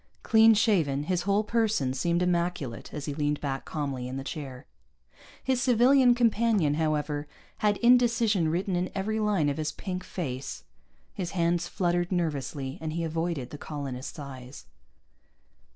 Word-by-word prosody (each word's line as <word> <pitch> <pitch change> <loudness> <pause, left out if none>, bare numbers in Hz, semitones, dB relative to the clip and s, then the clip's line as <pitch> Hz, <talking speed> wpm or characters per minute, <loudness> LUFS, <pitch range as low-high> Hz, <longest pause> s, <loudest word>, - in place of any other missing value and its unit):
Clean 225 0 +6
shaven, 165 - +2
his 180 +2 0
whole 200 +2 +3
person 215 - +1
seemed 170 +6 0
immaculate 170 -8 -2
as 145 -2 -5
he 145 - -3
leaned 145 0 -1
back 135 -2 -3
calmly 140 -5 -3
in 130 +1 -5
the 135 - -4
chair. 140 -3 -7 0.8
His 260 -2 +1
civilian 250 +1 +5
companion, 225 -9 +2
however, 150 -1 -1 0.3
had 210 -1 +2
indecision 230 -7 +4
written 180 +3 -1
in 180 +1 -1
every 215 +3 -1
line 205 -8 +1
of 145 - -1
his 155 -1 -2
pink 185 +2 -5
face. 135 -7 -5 0.5
His 180 -2 -4
hands 170 +1 +1
fluttered 175 0 0
nervously, 145 -3 -2
and 155 -1 -3
he 170 +1 -2
avoided 160 -5 -2
the 145 - -8
colonist's 140 -2 -6
eyes. 135 -2 -9
170 Hz, 150 wpm, -28 LUFS, 145-205 Hz, 0.8 s, Clean